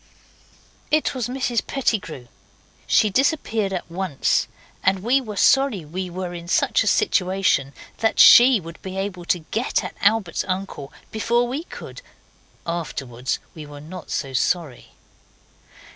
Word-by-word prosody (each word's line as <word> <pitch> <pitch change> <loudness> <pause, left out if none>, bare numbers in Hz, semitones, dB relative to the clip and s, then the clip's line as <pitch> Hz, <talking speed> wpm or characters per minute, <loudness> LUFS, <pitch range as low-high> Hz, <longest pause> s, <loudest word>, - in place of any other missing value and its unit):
It 310 0 +2
was 255 -4 -2
Mrs 250 -2 -2
Pettigrew. 185 - -2 0.6
She 215 - +3
disappeared 225 - +1
at 185 - -4
once, 175 -4 0 0.4
and 190 0 +1
we 255 +4 +3
were 215 -5 -7
sorry 270 - +3
we 180 +4 -5
were 180 0 -5
in 170 -1 -8
such - - +2
a - - -4
situation 185 - +2 0.3
that 225 - +1
she 245 -1 +8
would 165 -1 -11
be 190 0 -7
able 195 -3 -4
to 175 -2 -1
get 230 +4 0
at - - -6
Albert's 200 -3 +2
uncle 185 -7 -4 0.2
before 235 +2 +1
we 280 +7 -4
could. - - -10 0.6
Afterwards 135 -7 -3 0.2
we 155 -2 -9
were 145 0 -10
not 170 +5 -10
so 135 -2 -3
sorry. 150 -1 -1
190 Hz, 140 wpm, -22 LUFS, 170-230 Hz, 0.6 s, she